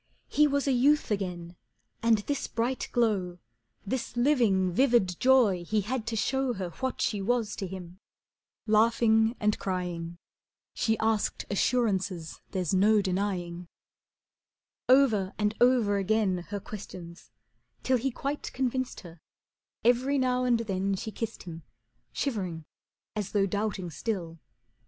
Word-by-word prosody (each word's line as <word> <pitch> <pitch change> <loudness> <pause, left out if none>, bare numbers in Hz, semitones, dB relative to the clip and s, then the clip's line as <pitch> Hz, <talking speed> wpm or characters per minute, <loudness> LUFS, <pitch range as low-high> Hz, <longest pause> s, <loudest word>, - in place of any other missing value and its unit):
He 300 0 +4
was 280 0 0
a - - +3
youth 275 +2 +3
again, 180 -4 -3 0.5
and 230 -1 +4
this 285 -1 -2
bright 240 +3 -2
glow, 200 -7 0 0.5
This 240 +3 -3
living, 235 -9 +3
vivid 235 -5 +2
joy 240 -9 +4
he 215 +4 0
had 225 +3 -3
to 230 - -2
show 265 +3 0
Her 185 -5 -5
what 260 +7 -4
she 205 -2 0
was 230 +1 0
to 195 - -3
him. 180 -1 -9 0.7
Laughing 225 +1 +3
and 210 0 +1
crying, 175 -3 -3 0.6
She 220 -1 0
asked 220 -1 0
assurances 195 -6 0
there's 185 -3 -2
no 205 +2 +4
denying. 180 -2 -2 1.2
Over 225 -8 +4
and 210 0 +1
over 240 -5 +4
again 195 -3 0
her 205 -1 -3
questions, 185 -4 -10 0.5
till 260 -1 +3
He 270 +4 0
quite 280 +3 -4
convinced 260 0 -2
her, 170 -2 -13 0.7
every 255 +4 +3
now 255 -1 +1
and 240 -2 +2
then 195 -2 -1
She 220 +3 -5
kissed 225 +1 -5
him, 165 -2 -8 0.5
shivering 185 - -3 0.5
as 210 -3 -4
though 200 -2 +3
doubting 200 -3 -2
still. 170 -4 -4
210 Hz, 135 wpm, -28 LUFS, 185-245 Hz, 1.2 s, He